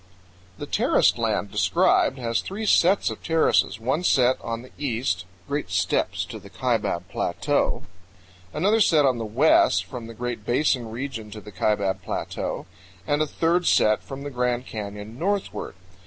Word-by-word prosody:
The -, -, -5 dB
terraced -, -, +2 dB
land -, -, -1 dB
described 130 Hz, -, +2 dB
has 115 Hz, -3 st, -1 dB
three 210 Hz, +3 st, -5 dB
sets 195 Hz, -1 st, +4 dB
of -, -, -8 dB
terraces: 160 Hz, -, +2 dB
one 130 Hz, +9 st, -1 dB
set 130 Hz, -6 st, +3 dB
on 115 Hz, +1 st, -4 dB
the 130 Hz, -, -14 dB
east, 115 Hz, -10 st, -1 dB, 0.2 s
great 145 Hz, -6 st, -3 dB
steps 90 Hz, -1 st, 0 dB
to -, -, -8 dB
the -, -, -14 dB
Kaibab 85 Hz, +2 st, -1 dB
Plateau; -, -, -1 dB, 0.7 s
another 205 Hz, +8 st, +2 dB
set 155 Hz, -7 st, +4 dB
on 130 Hz, -3 st, +2 dB
the 115 Hz, -, -3 dB
west, 130 Hz, +9 st, +3 dB
from 120 Hz, -4 st, -8 dB
the 115 Hz, -, -10 dB
Great 120 Hz, -2 st, -4 dB
Basin 120 Hz, 0 st, +1 dB
region 115 Hz, -2 st, -5 dB
to 105 Hz, -, -8 dB
the 105 Hz, 0 st, -12 dB
Kaibab 100 Hz, 0 st, 0 dB
Plateau; -, -, -4 dB, 0.4 s
and 145 Hz, +7 st, +1 dB
a 155 Hz, -, +1 dB
third 170 Hz, +4 st, +1 dB
set 110 Hz, 0 st, +4 dB
from 135 Hz, 0 st, -8 dB
the 145 Hz, -, -5 dB
Grand 125 Hz, 0 st, -1 dB
Canyon 105 Hz, +1 st, -7 dB
northward. 200 Hz, -, -2 dB
125 Hz, 160 wpm, -24 LUFS, 110-150 Hz, 0.7 s, sets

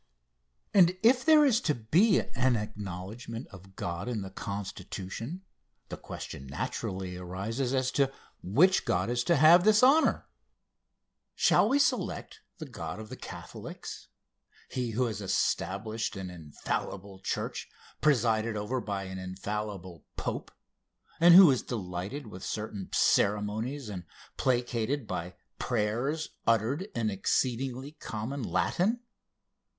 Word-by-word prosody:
And 185 Hz, -2 st, +6 dB
if 245 Hz, +3 st, +5 dB
there 310 Hz, -2 st, +7 dB
is 245 Hz, -4 st, +3 dB
to 150 Hz, -, +1 dB
be 175 Hz, -, +3 dB
an 130 Hz, -1 st, +2 dB
acknowledgment 105 Hz, +3 st, -6 dB
of 95 Hz, 0 st, -14 dB
God 85 Hz, +3 st, -4 dB
in 115 Hz, -5 st, -2 dB
the 95 Hz, -, -8 dB
Constitution, 100 Hz, -, -6 dB, 0.5 s
the -, -, -4 dB
question 70 Hz, -, -8 dB
naturally 90 Hz, +6 st, -4 dB
arises 100 Hz, +8 st, -3 dB
as 130 Hz, -1 st, +1 dB
to 135 Hz, -1 st, +2 dB, 0.3 s
which 165 Hz, -, +4 dB
God 90 Hz, +5 st, 0 dB
is 120 Hz, 0 st, 0 dB
to 170 Hz, -, +4 dB
have 165 Hz, +4 st, +7 dB
this 215 Hz, +3 st, +5 dB
honor. 285 Hz, +5 st, +5 dB, 1.1 s
Shall 210 Hz, -, +4 dB
we 275 Hz, -, +4 dB
select 285 Hz, -, 0 dB, 0.2 s
the 155 Hz, -, -6 dB
God 85 Hz, -, -6 dB
of 110 Hz, -1 st, -8 dB
the 130 Hz, -, -6 dB
Catholics -, -, -8 dB, 0.6 s
he 125 Hz, -2 st, -2 dB
who 120 Hz, +3 st, +1 dB
has 110 Hz, -3 st, -3 dB
established 110 Hz, +3 st, -1 dB
an 95 Hz, -2 st, -5 dB
infallible 90 Hz, +4 st, -5 dB
church 95 Hz, -, -3 dB, 0.3 s
presided 115 Hz, -6 st, +2 dB
over 120 Hz, +5 st, -2 dB
by 100 Hz, -3 st, -3 dB
an 95 Hz, 0 st, -6 dB
infallible 95 Hz, -2 st, -5 dB
pope, -, -, -3 dB, 0.7 s
and 170 Hz, +1 st, +8 dB
who 185 Hz, -5 st, +10 dB
is 130 Hz, -, +1 dB
delighted 100 Hz, +4 st, -5 dB
with 95 Hz, -4 st, -10 dB
certain 105 Hz, -3 st, -4 dB
ceremonies 110 Hz, +6 st, +1 dB
and 95 Hz, -4 st, -6 dB, 0.3 s
placated 125 Hz, +1 st, 0 dB
by 90 Hz, -2 st, -5 dB, 0.2 s
prayers 125 Hz, +7 st, -1 dB, 0.2 s
uttered 115 Hz, -, +2 dB
in 110 Hz, -2 st, 0 dB
exceedingly 130 Hz, +6 st, -1 dB
common 135 Hz, -2 st, -5 dB
Latin? 180 Hz, -, 0 dB
115 Hz, 125 wpm, -29 LUFS, 95-140 Hz, 1.1 s, who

